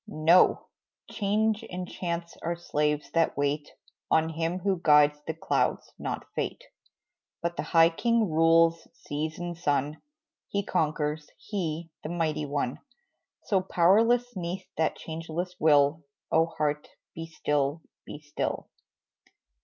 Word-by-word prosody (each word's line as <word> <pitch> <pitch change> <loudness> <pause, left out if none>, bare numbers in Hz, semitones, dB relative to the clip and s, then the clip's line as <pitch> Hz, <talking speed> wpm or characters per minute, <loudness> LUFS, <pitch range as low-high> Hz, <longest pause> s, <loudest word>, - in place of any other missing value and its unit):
No! 170 -1 +4 0.4
change 215 +1 0
and 180 0 -5
chance 170 -1 -4
are 170 +1 -2
slaves 150 -3 -1
that 165 -4 +1
wait 145 +1 -1 0.4
On 160 0 +3
Him 165 +2 -2
who 185 -1 -1
guides 150 -1 +5
the 160 - -2
clouds, 165 - -1
not - - -4
fate, - - -3 0.8
But 170 0 -1
the - - -2
High 165 0 +4
King 230 +4 +1
rules 165 0 +3
seas 155 +2 -4
and 175 0 -4
sun, 150 -3 -1 0.5
He 200 0 -1
conquers, 150 -2 -1
He, 170 -5 -4
the 155 - -6
Mighty 160 -3 -1
One. 140 -3 -2 0.6
So 195 -3 +1
powerless, 225 +7 +3
'neath 180 0 -4
that 160 0 +1
changeless 165 +2 -5
will, 150 0 +4 0.3
Oh, 165 +1 +4
heart, 150 -2 -2 0.3
be 165 0 -6
still 150 -1 -1 0.2
be 150 - -9
still! 145 0 -4
165 Hz, 130 wpm, -28 LUFS, 150-180 Hz, 0.8 s, guides